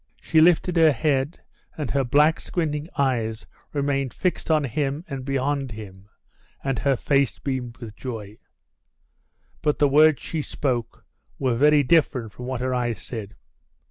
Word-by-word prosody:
She 160 - +3
lifted 175 +1 +4
her 160 -2 +6
head 140 +2 0 0.4
and 150 -6 -3
her 140 -1 +1
black 150 +5 +3
squinting 155 -2 -3
eyes 115 -5 0 0.3
remained 140 -2 -1
fixed 180 -2 -1
on 155 -2 +3
him 140 +4 -2
and 135 -4 -5
beyond 135 -1 -1
him, 100 -2 -11 0.5
and 135 -4 -1
her 140 -1 +2
face 140 +1 +1
beamed 130 -3 -4
with 110 -4 -9
joy. 110 -5 -7 1.2
But 150 -1 +1
the 145 - +4
words 150 +1 +5
she 160 - -3
spoke 125 -5 -3 0.3
were 130 -3 +1
very 145 +4 +4
different 130 -6 +2
from 125 - -8
what 130 -2 -3
her 130 0 -1
eyes 120 -5 -1
said. 110 -4 -7
135 Hz, 150 wpm, -24 LUFS, 120-150 Hz, 1.2 s, her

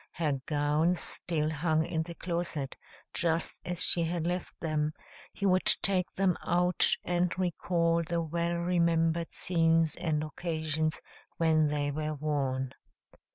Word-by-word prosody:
Her 150 -5 -1
gowns 150 +4 +2
still 155 -3 -2
hung 160 0 +1
in 160 -1 -1
the 170 +1 -6
closet, 170 -6 -3 0.4
just 165 -1 -1
as 180 -1 0
she 170 - +3
had 165 0 -2
left 180 +1 -3
them; 155 -2 -1 0.4
he 200 - -4
would 185 -1 +3 0.2
take 185 -2 +1
them 190 -2 +2
out 180 +1 +4
and 175 0 +1
recall 170 -2 +1
the 170 +1 -1
well 170 +2 -1
remembered 170 -1 +1
scenes 165 -2 +2
and 160 -4 -1
occasions 155 -1 -2 0.4
when 160 -2 +3
they 145 -1 -1
were 155 +1 -3
worn. 135 -3 -1
165 Hz, 135 wpm, -30 LUFS, 155-175 Hz, 0.4 s, out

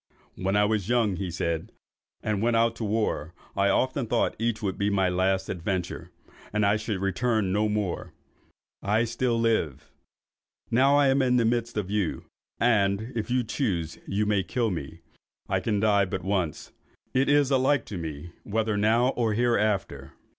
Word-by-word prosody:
"When 95 +2 -1
I 105 0 +4
was 105 -1 -1
young," 115 -6 +2
he 95 -2 -3
said, 85 -1 -2 0.5
"and 105 -2 -1
went 115 +1 +2
out 115 0 +3
to - - -4
war, 100 -7 -1 0.2
I 100 0 +2
often 130 +1 +1
thought 115 +1 +1
each 115 -1 0
would 95 -2 -1
be 100 0 0
my 95 -2 +2
last 95 +1 +1
adventure, 90 0 -3 0.4
and 105 0 +1
I 100 +1 +4
should 105 -2 -3
return 105 +1 0
no 105 +2 +1
more. 105 -4 -2 0.7
I 105 +3 +2
still 120 0 0
lived. 110 - 0 0.9
Now 135 +4 +4
I 140 -2 +4
am 135 +1 +3
in 125 -1 +2
the 120 -2 +3
midst 115 0 0
of 100 -2 -2
you, 105 -5 -1 0.4
and, 110 -1 +2
if 110 -1 -3
you 125 0 +1
choose, 95 - -2
you 105 +2 0
may 105 -2 +2
kill 115 +5 -1
me. 80 -1 -6 0.5
I - - +1
can 105 -3 -1
die 100 -2 +3
but 95 -1 -4
once. 95 -4 -2 0.4
It 135 +2 +2
is 145 -1 +4
alike 130 0 +2
to 100 - -6
me 80 0 -6
whether 110 +1 -1
now 115 +4 +3
or 115 -5 0
hereafter!" 110 -4 0
105 Hz, 175 wpm, -26 LUFS, 95-115 Hz, 0.9 s, I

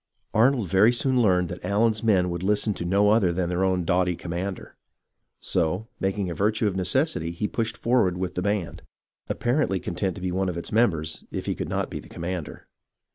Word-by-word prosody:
Arnold 120 -1 +3
very 95 +6 +5
soon 125 +1 +2
learned 90 -5 +3
that 90 - -7
Allen's 105 +3 +1
men 95 -5 +3
would 85 0 -4
listen 105 +2 +1
to 85 - -5
no 100 +3 +3
other 105 -5 +3
than 85 0 -1
their 90 +1 0
own 95 -2 +1
doughty 90 +1 +2
commander; 90 +3 -5 0.7
so, 90 +8 -1
making 95 0 -1
a 85 - -3
virtue 105 +6 +1
of 100 -3 0
necessity, 95 - +1
he 85 +5 -2
pushed 110 0 -2
forward 115 -7 +2
with 90 0 -3
the 90 - -2
band, 100 -3 -2 0.5
apparently 120 -6 0
content 90 +2 -3
to - - -9
be 90 - -1
one 95 +1 0
of 85 - -4
its 85 - -5
members, 80 -9 +1
if - - -5
he - - 0
could - - -5
not - - -2
be - - -4
the - - -13
commander. 85 -2 -6
95 Hz, 200 wpm, -25 LUFS, 90-110 Hz, 0.7 s, very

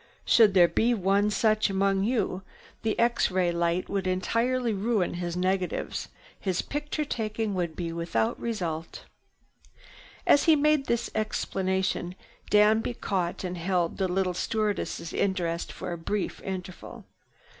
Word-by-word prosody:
Should 215 -4 +5
there 175 -2 +7
be 235 +7 +2
one 200 +1 +2
such 215 0 +2
among 195 0 +1
you, 210 -6 0 0.4
the 220 -1 -1
X 235 0 +2
ray 180 -2 +1
light 170 +1 0
would 195 -2 -2
entirely 230 +6 0
ruin 205 -1 0
his 175 0 -3
negatives. 185 0 -1 0.3
His 185 -3 -1
picture 295 +1 -3
taking 220 -4 -2
would 175 -4 -2
be 170 -2 -4
without 165 -10 -1
result." 170 -8 -4 1.2
As 285 - +5
he 320 - +6
made 300 -1 +2
this 235 0 -1
explanation 190 -4 -1 0.3
Danby 215 +3 +4
caught 180 -5 -2
and 180 -1 -4
held 175 -1 0
the 190 - +2
little 185 0 0
stewardess' 210 -3 -2
interest 175 -4 -1
for - - -6
a 170 - -6
brief 200 +4 -3
interval. 185 -1 -7
195 Hz, 135 wpm, -27 LUFS, 180-220 Hz, 1.2 s, there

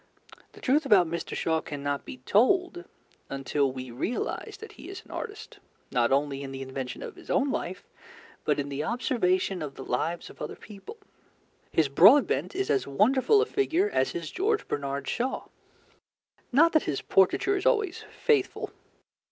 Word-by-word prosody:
The - - -14
truth 285 +4 +3
about 205 -10 +5
Mt. 170 +1 -4
Shaw 160 -1 +1
cannot 145 -1 -4
be 125 - -9
told 355 - +2 0.4
until 135 0 0
we 130 -1 -7
realize 245 - -3
that 440 +1 -10
he - - -12
is 390 - -8
an - - -15
artist, 425 -2 -7 0.3
not 120 0 +2
only 140 0 +1
in 135 -1 -6
the 135 0 -5
invention 130 -1 -6
of - - -8
his - - -15
own 275 0 +2
life, 180 -5 -4 0.6
but - - +1
in 140 0 -2
the 140 +1 -3
observation 190 - 0
of 145 -3 -5
the 135 - -8
lives 165 +7 -2
of - - -17
other - - -5
people. 210 - -11 0.7
His 160 -3 +3
Broadbent 240 - +5
is 390 +1 0
as 135 -1 +1
wonderful 260 - +4
a - - -2
figure 400 0 +1
as - - +1
his - - -5
George 420 +3 0
Bernard 140 0 -3
Shaw. 255 +2 -2 1.1
Not 320 +6 +5
that 315 - +2
his 140 - -2
portraiture 195 - +3
is 385 +4 0
always 425 -7 +1
faithful. 420 -5 0
195 Hz, 170 wpm, -27 LUFS, -, 1.1 s, about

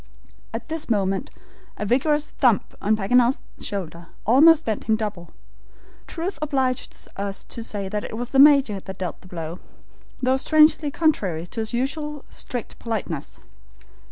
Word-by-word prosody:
At 225 +1 -5
this 320 -3 -4
moment 195 -3 0 0.5
a 210 - -3
vigorous 295 +6 +1
thump 245 -7 +2
on 215 +2 +2
Paganel's 245 +5 +3 0.2
shoulder 170 -4 -5 0.2
almost 305 +7 +6
bent 220 -2 -2
him 220 - +3
double. 205 -6 -4 0.8
Truth 350 +3 -4
obliges 265 -4 -1
us 200 0 -4
to 230 - -7
say 205 -3 -4
it 210 +2 -4
was 245 +1 -4
the 270 - +3
Major 275 -8 +6
that 190 0 -9
dealt 180 -3 -5
the 185 - -15
blow, 170 -1 -6 0.6
though 260 +1 +2
strangely 305 +1 +4
contrary 210 - 0
to 200 - -7
his 220 0 -2
usual 290 +4 -2
strict 245 -3 -6
politeness. 195 -10 -4
230 Hz, 145 wpm, -23 LUFS, 195-280 Hz, 0.8 s, almost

